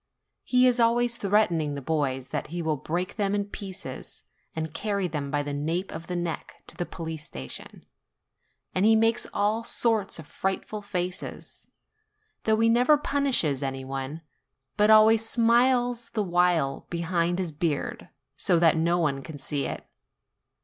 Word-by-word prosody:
He 250 0 +4
is 250 -1 +3
always 235 +1 +3
threatening 175 -9 +1
the - - -4
boys 135 -4 -1
that - - -3
he 170 +2 -4
will 160 -1 +1
break 175 - -3
them 200 -1 +1
in 205 0 0
pieces 195 -1 -8 0.3
and 160 -1 -4
carry 200 -1 -1
them 150 -4 -4
by 145 0 0
the 145 0 -4
nape 165 +6 -2
of 165 - -7
the 180 - -3
neck 175 -2 -4
to - - -10
the 175 - -3
police 160 -3 -6
THE 65 - -7
PRINCIPAL 65 - -3
39 - - -12
station; - - -41 0.8
and 185 - +1
he 220 +1 +6
makes 225 +1 +2
all 210 +3 0
sorts 225 -4 0
of 160 - -9
frightful 190 +5 -3
faces; 180 -3 -5 0.8
though 220 0 +3
he 230 - +4
never 245 +6 +5
punishes 270 - +1
any 135 -1 -3
one, 135 +4 -5 0.5
but 210 0 +3
always 220 +1 +7
smiles 240 +1 +2
the 215 - +1
while 175 -6 +1
behind 170 0 0
his 180 -3 -2
beard, 150 -1 -3 0.3
so 180 +2 +2
that 165 -1 +5
no 170 +2 +2
one 145 -5 0
can 155 +1 -9
see 140 +1 -3
it. - - -6
180 Hz, 170 wpm, -26 LUFS, 155-220 Hz, 0.8 s, always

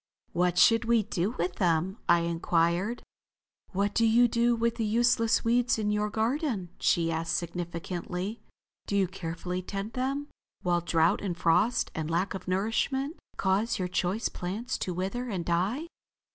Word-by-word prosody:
"What 180 0 +1
should 225 +5 +5
we 230 -1 +3
do 205 +2 -2
with 175 +1 -2
them?" 180 +4 +1
I 170 0 +6
inquired. 170 +5 0 0.7
"What 200 +2 0
do 230 - +2
you 230 +2 +5
do 235 +1 +2
with 230 0 0
the 230 - 0
useless 230 +1 +2
weeds 240 +1 +3
in 210 -1 0
your 210 0 0
garden," 225 - -1
she 165 -1 +2
asked 165 +1 -1
significantly. 175 +4 -4 0.5
"Do 200 - 0
you 195 -2 +3
carefully 180 0 -4
tend 200 +4 -5
them, 275 +4 -2 0.3
while 175 -1 +2
drouth 170 +2 +2
and 180 -4 -3
frost 205 +8 +2
and 155 -1 -3
lack 175 +4 0
of 190 - -7
nourishment 225 - 0 0.2
cause 200 +5 +1
your 185 -3 -1
choice 185 +4 0
plants 210 +8 -4
to 180 - -2
wither 220 +8 -3
and 185 -6 -3
die?" 190 - 0
195 Hz, 160 wpm, -29 LUFS, 175-230 Hz, 0.7 s, I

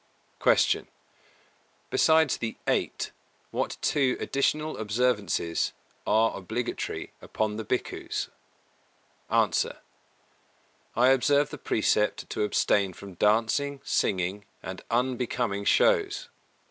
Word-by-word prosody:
258. - - +4
Q. - - -34 1.0
Besides 160 -3 +4
the 115 -1 -4
Eight, - - -1 0.4
what - - -2
two 135 -3 +2
additional 150 +3 0
observances 105 -6 0 0.3
are 110 +1 +3
obligatory 110 +6 -4
upon 105 -1 -2
the 110 - -3
Bhikkhus? 120 +4 -2 1.0
A. - - +3 1.4
I 125 +3 +5
observe 140 +2 +3
the 150 - -7
precept 105 -2 +1
to - - -2
abstain 100 -2 +2
from 100 +2 -10
dancing, 115 +9 +1
singing 95 +1 0 0.2
and 95 0 -6
unbecoming 120 -4 -1
shows. 415 - +3
115 Hz, 95 wpm, -27 LUFS, 105-140 Hz, 1.4 s, I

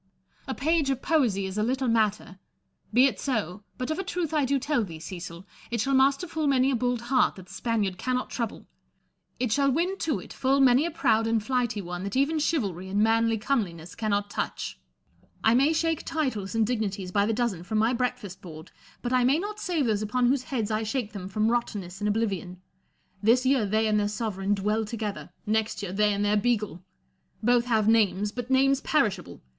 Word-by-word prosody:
A - - -3
page 310 -1 +1
of 265 -1 -1
poesy 240 -12 +2
is 190 +2 -4
a - - +2
little 260 +4 0
matter: 215 -4 0 0.5
be 245 +4 +6
it 275 - 0
so; 210 - -2
but 255 +4 -3
of 315 - -2
a - - -1
truth 355 -4 -3
I 300 -3 +2
do 275 +2 +1
tell 275 -2 0
thee, 165 -5 -8
Cecil, 175 +1 -8 0.2
it 235 0 -2
shall 270 +6 0
master 275 +5 +3
full 320 -2 -2
many 270 -1 +3
a - - +1
bold 245 0 0
heart 250 +2 +2
that 185 - -11
the 180 - -14
Spaniard 205 -4 -1
cannot 255 0 -2
trouble; 230 -3 -4 0.7
it 250 -3 0
shall 275 +4 +3
win 350 +8 0
to 315 -3 0
it - - -11
full 270 +1 +1
many 265 +3 +5
a - - -2
proud 225 -9 +2
and 225 -2 +1
flighty 240 -4 -1
one 175 +1 -5
that 200 +3 -4
even 285 +4 +2
chivalry 200 - -1
and 205 +2 +2
manly 225 0 +3
comeliness 195 -9 -2
cannot 205 -2 -1
touch, - - -4 0.6
I 225 - +5
may 275 +5 +4
shake 325 0 0
titles 235 -10 -2
and 225 -1 +3
dignities 205 -5 -2
by 200 +1 +2
the - - +1
dozen 225 -6 -1
from 215 +5 -3
my 225 +3 +3
breakfast 240 -6 -3
board; 160 -3 -11 0.3
but 245 +1 -1
I 250 -1 +4
may 265 +4 +4
not 415 +4 -4
save 340 -8 0
those 215 -3 +1
upon 245 +4 0
whose 255 +1 +2
heads 225 -5 -2
I 215 0 0
shake 220 0 -3
them 190 -3 -6
from 215 +3 +1
rotten 240 -3 -1
ness 180 +2 -10
and 210 - 0
oblivion. 195 -4 -2 0.6
This 240 +4 +3
year 260 -5 +3
they 220 +2 +1
and 215 -1 +2
their 205 - +1
sovereign 205 -2 -1
dwell 210 +3 0
together; 210 -2 -5 0.2
next 220 0 -1
year, 185 -2 -4
they 210 +1 +3
and 205 0 0
their 210 +1 +3
beagle. 210 -5 0 0.6
Both 240 +1 +3
have 220 -4 +2
names, 210 -2 +3
but 245 +2 -6
names 270 +1 +3
perishable. 205 - -1
225 Hz, 210 wpm, -27 LUFS, 205-265 Hz, 0.7 s, be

